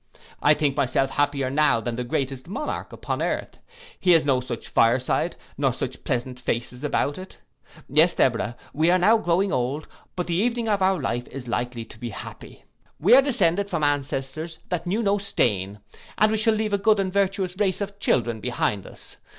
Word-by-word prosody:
I 150 +1 +5
think 145 -2 0
myself 135 -1 +1
happier 140 -2 0
now 145 -5 +3
than 115 +1 -3
the 125 - -3
greatest 130 +2 -3
monarch 250 - -4
upon - - -4
earth. - - -3 0.4
He 180 -2 +4
has 160 -2 +4
no 135 -3 +3
such 120 -2 -6
fire 115 +2 +4
side, 130 - -1 0.2
nor - - +3
such - - -5
pleasant 125 +1 -2
faces 125 +2 -3
about 145 +1 0
it. 185 - -11 0.5
Yes, 160 +5 +4
Deborah, 120 -1 +1 0.2
we 160 +3 +2
are 180 - +5
now 215 +5 +4
growing 185 0 +1
old; 130 +5 -1 0.3
but 180 - -2
the 175 - -2
evening 230 +4 0
of 205 -2 +1
our 190 -1 +3
life 120 -3 -2
is 130 -2 -8
likely 120 0 -3
to 110 - -14
be 120 - -5
happy. 100 - -10 0.4
We - - +5
are 265 - +9
descended 200 - +1
from 155 - -2
ancestors 145 +2 -2
that 175 -1 -2
knew 210 +6 0
no 200 0 +2
stain, 100 - 0 0.4
and 215 0 +4
we 220 - +1
shall 220 0 +3
leave 215 -1 -1
a 200 - +2
good 215 0 +3
and 190 -1 -1
virtuous 195 -2 0
race 195 -3 +1
of 200 0 -5
children 120 - +1
behind 105 -4 -1
us. - - -14
150 Hz, 195 wpm, -24 LUFS, 125-195 Hz, 0.5 s, are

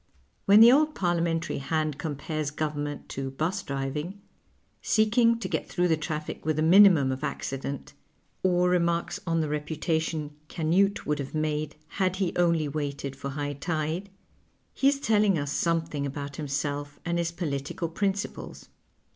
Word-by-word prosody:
When 205 +2 +7
the 235 +1 +10
old 305 +3 +3
Parliamentary 170 -3 0
hand 155 +1 -1
compares 155 -1 -3
govern 150 0 -2
ment 145 -1 -7
to 135 0 -4
'bus 160 +9 -2
driving, 150 +5 -4 0.6
seeking 230 +2 +3
to 230 - -4
get - - -3
through 180 -1 +1
the 160 - +4
traffic 155 0 -5
with 155 0 0
the 155 - +1
minimum 170 -6 +7
of 130 +2 -4
accident, 135 -1 -4 0.5
or 180 -1 +3
remarks 170 -1 +1
on 165 0 +2
the 155 - -1
reputation 155 +1 -2 0.2
Canute 180 +6 +1
would 150 0 -1
have 140 +2 -5
made 155 -1 -1 0.2
had 185 -1 +2
he 190 -2 -1
only 170 -3 +2
waited 140 -2 -4
for 140 0 -5
high 145 +1 -3
tide, 160 +5 -3 0.6
he 270 - +2
is 280 0 +3
telling 210 -6 +3
us 145 -1 -2
something 165 -4 0
about 140 0 -6
himself 145 0 -3
and 170 0 0
his 170 0 -1
political 155 -1 -3
principles. 195 +4 -3
160 Hz, 155 wpm, -27 LUFS, 145-180 Hz, 0.6 s, the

